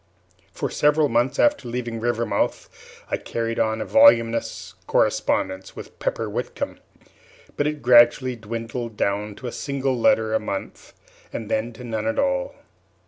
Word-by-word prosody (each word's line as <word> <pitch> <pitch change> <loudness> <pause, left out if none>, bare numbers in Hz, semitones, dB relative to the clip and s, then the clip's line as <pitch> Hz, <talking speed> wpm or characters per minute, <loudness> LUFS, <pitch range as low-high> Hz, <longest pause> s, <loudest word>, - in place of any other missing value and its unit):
For - - -4
several 150 0 +3
months 120 +3 +1
after 295 - +2
leaving 120 -1 -4
Rivermouth 115 -3 -1 0.4
I - - +1
carried 115 0 -3
on 110 0 0
a - - -3
voluminous 115 - +3
correspondence 95 0 0
with - - -11
Pepper - - -2
Whitcomb; - - -4 0.8
but 145 - 0
it 150 -2 -4
gradually 120 +1 +5
dwindled 115 0 -6
down 105 +1 -1
to 130 - -11
a 120 - -3
single 135 0 -2
letter 110 -2 +2
a - - +3
month, 100 -2 -6 0.4
and 110 -1 -6
then 110 +2 0
to 115 - -11
none 115 - -3
at 285 0 -1
all. 275 -1 0
120 Hz, 145 wpm, -23 LUFS, 110-135 Hz, 0.8 s, gradually